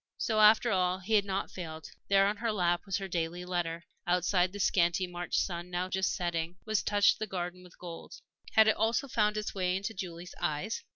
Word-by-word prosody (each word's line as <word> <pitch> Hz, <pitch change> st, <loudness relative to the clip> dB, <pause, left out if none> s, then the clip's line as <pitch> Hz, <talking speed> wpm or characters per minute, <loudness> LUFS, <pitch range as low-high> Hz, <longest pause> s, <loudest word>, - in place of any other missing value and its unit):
So, 220 Hz, -2 st, 0 dB
after 215 Hz, +2 st, +6 dB
all, 185 Hz, -1 st, +2 dB
he 190 Hz, +4 st, -4 dB
had 205 Hz, -2 st, +4 dB
not 195 Hz, 0 st, -2 dB
failed; 160 Hz, -3 st, -7 dB, 0.2 s
there 195 Hz, 0 st, +5 dB
on 205 Hz, +1 st, 0 dB
her 230 Hz, +1 st, -1 dB
lap 175 Hz, -2 st, 0 dB
was 195 Hz, -, 0 dB
her 195 Hz, -1 st, -5 dB
daily 175 Hz, 0 st, -3 dB
letter. 170 Hz, -2 st, -2 dB, 0.2 s
Outside 180 Hz, +1 st, +2 dB
the 205 Hz, -, -8 dB
scanty 175 Hz, -1 st, +2 dB
March 175 Hz, 0 st, -3 dB
sun, 175 Hz, -1 st, -2 dB
now 180 Hz, +1 st, -2 dB
just 190 Hz, 0 st, 0 dB
setting, 175 Hz, -1 st, -2 dB
was 215 Hz, -4 st, +1 dB
touching 205 Hz, +3 st, +3 dB
the 215 Hz, -, -2 dB
garden 180 Hz, -1 st, -4 dB
with 180 Hz, -, -17 dB
gold. 170 Hz, -2 st, -9 dB, 0.4 s
Had 220 Hz, 0 st, +6 dB
it 220 Hz, -, +4 dB
also 230 Hz, +5 st, +1 dB
found 210 Hz, -4 st, +1 dB
its 215 Hz, -, -3 dB
way 185 Hz, -2 st, 0 dB
into 200 Hz, +4 st, -4 dB
Julie's 180 Hz, -2 st, -7 dB
eyes? 175 Hz, +6 st, -2 dB
185 Hz, 210 wpm, -30 LUFS, 175-205 Hz, 0.4 s, after